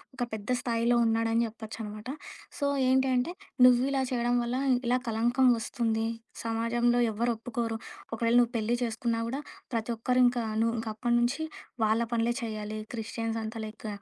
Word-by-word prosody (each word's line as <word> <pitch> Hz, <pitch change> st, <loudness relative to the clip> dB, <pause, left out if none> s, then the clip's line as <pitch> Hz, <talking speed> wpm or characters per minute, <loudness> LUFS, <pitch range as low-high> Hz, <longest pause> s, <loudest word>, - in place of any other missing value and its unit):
ఒక 245 Hz, -2 st, -1 dB
పెద్ద 210 Hz, 0 st, -5 dB
స్థాయిలో 235 Hz, 0 st, +2 dB
ఉన్నాడని 225 Hz, +1 st, +2 dB
జెప్పొచ్చనమాట. 220 Hz, -1 st, -8 dB, 0.5 s
సో, 290 Hz, -, -1 dB, 0.2 s
ఏంటంటే 260 Hz, +3 st, +2 dB, 0.3 s
"నువ్విలా 260 Hz, +2 st, +4 dB
చేయడం 240 Hz, -1 st, +1 dB
వల్ల 240 Hz, +1 st, -2 dB, 0.3 s
ఇలా 245 Hz, +1 st, +2 dB
కలంకం 240 Hz, +4 st, +3 dB
వస్తుంది. 225 Hz, -1 st, -1 dB, 0.4 s
సమాజంలో 230 Hz, +1 st, +1 dB
ఎవ్వరు 235 Hz, +3 st, 0 dB
ఒప్పుకోరు. 230 Hz, -1 st, -3 dB, 0.4 s
ఒకవేళ 230 Hz, +1 st, +1 dB
నువ్వు 240 Hz, -1 st, +3 dB
పెళ్లి 225 Hz, +2 st, +1 dB
చేసుకున్నా 230 Hz, 0 st, -1 dB
గూడా, 270 Hz, +4 st, -3 dB, 0.3 s
ప్రతి 230 Hz, 0 st, -1 dB
ఒక్కరు 250 Hz, +3 st, +1 dB
ఇంక 245 Hz, 0 st, +2 dB, 0.2 s
నువ్వు 230 Hz, 0 st, +2 dB
ఇంకప్పటి 225 Hz, +2 st, -1 dB
నుంచి 250 Hz, +6 st, 0 dB, 0.4 s
వాళ్ళ 220 Hz, +2 st, +2 dB
పనులే 235 Hz, +1 st, +2 dB
చేయాలి. 215 Hz, -1 st, -4 dB, 0.2 s
క్రిస్టియన్స్ 225 Hz, 0 st, -3 dB
అంతా 220 Hz, +1 st, -5 dB
లైక్ 215 Hz, 0 st, -8 dB
230 Hz, 140 wpm, -29 LUFS, 225-245 Hz, 0.5 s, నువ్విలా